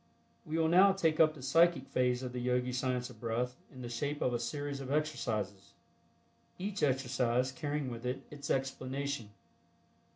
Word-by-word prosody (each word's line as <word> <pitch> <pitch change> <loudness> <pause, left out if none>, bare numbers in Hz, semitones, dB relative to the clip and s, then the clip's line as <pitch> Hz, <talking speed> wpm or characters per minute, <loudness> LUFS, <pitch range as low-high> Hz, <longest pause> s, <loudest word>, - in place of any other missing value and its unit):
We 155 +1 -1
will 160 -1 +3
now 190 +4 +7
take 165 -5 +1
up 155 -1 +6
the 135 - -10
Psychic 165 +2 +4
phase 125 -1 +1
of 125 -1 -4
the 125 - -3
Yogi 125 0 +1
Science 125 0 -1
of 115 - -15
Breath 120 +2 -1 0.2
in 130 -3 -9
the - - -4
shape 145 +5 -2
of 125 - +1
a 120 - 0
series 140 +4 -3
of 135 0 -5
exercises, 110 -9 -2 0.8
each 200 +2 -3
exercise 130 -2 +1
carrying 145 -2 -2
with 120 +1 -5
it 125 +2 -3
its 145 -1 -7
explanation. 135 -2 -2
130 Hz, 170 wpm, -33 LUFS, 125-150 Hz, 0.8 s, now